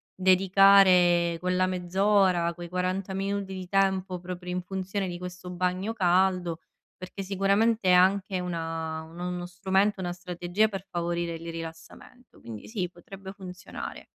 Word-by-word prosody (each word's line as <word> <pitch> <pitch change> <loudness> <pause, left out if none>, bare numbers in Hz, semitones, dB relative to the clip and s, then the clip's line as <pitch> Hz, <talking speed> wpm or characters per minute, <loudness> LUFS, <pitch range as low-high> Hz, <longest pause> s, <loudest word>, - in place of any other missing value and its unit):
dedicare 185 -2 +5
quella 180 +1 +1
mezz'ora, 185 -1 +2
quei 175 0 -8
40 185 +2 -2
minuti 195 0 -3
di 185 -1 -6
tempo 190 -2 +1
proprio 180 0 -7
in 180 0 -3
funzione 190 +1 -3
di 175 -1 -6
questo 180 0 -8
bagno 185 +4 -1
caldo, 180 -3 +1 0.4
perché 185 +2 -8
sicuramente 200 +2 +1
è - - +6
anche 190 +1 +3
una 165 -2 -4
un 165 +2 -13
uno 180 0 -4
strumento, 190 +3 0
una 175 -1 -2
strategia 180 +3 -1
per 195 -3 -6
favorire 170 -1 -2
il 165 - -9
rilassamento. 165 +9 -10
Quindi 110 -3 -9
sì 195 -6 -3
potrebbe 190 +2 -11
funzionare. 185 -2 -8
185 Hz, 140 wpm, -27 LUFS, 175-195 Hz, 0.4 s, è